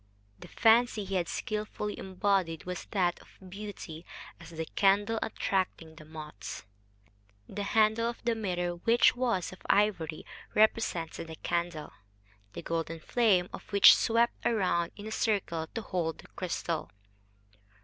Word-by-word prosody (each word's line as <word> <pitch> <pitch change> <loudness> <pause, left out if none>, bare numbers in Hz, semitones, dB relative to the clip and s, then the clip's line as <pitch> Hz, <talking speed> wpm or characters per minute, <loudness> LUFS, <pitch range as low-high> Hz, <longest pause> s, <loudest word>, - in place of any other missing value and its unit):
The - - -11
fancy 225 -2 +3
he 195 - -6
had 175 -3 +1
skilfully 210 -1 -3
embodied 190 -4 0
was 180 -1 -5
that 180 -4 +1
of - - -18 0.2
beauty 190 -4 -8 0.4
as 165 -1 -12
the 160 -1 -5
candle 205 +5 +2
attracting 185 -6 -2
the 155 -1 -13
moths. 150 -12 -8 0.8
The 205 - -5
handle 220 +3 +2
of 235 - -6
the 235 -1 +2
mirror, 180 -5 -2
which 230 +8 +4
was 235 -8 0
of 185 - -13
ivory, 190 -6 +1 0.3
represented 195 -7 +1
the 160 - -8
candle, 170 -2 -3 0.6
the - - -7
golden 165 0 -3
flame 195 -2 +2
of - - -10
which 200 -1 +9
swept 235 +1 +1
round 185 -6 +1
in 205 - -9
a 220 - -6
circle 195 -8 -1
to 225 - -3
hold 165 -5 -2
the - - -14
crystal. 170 -3 -3
190 Hz, 140 wpm, -30 LUFS, 165-215 Hz, 0.8 s, which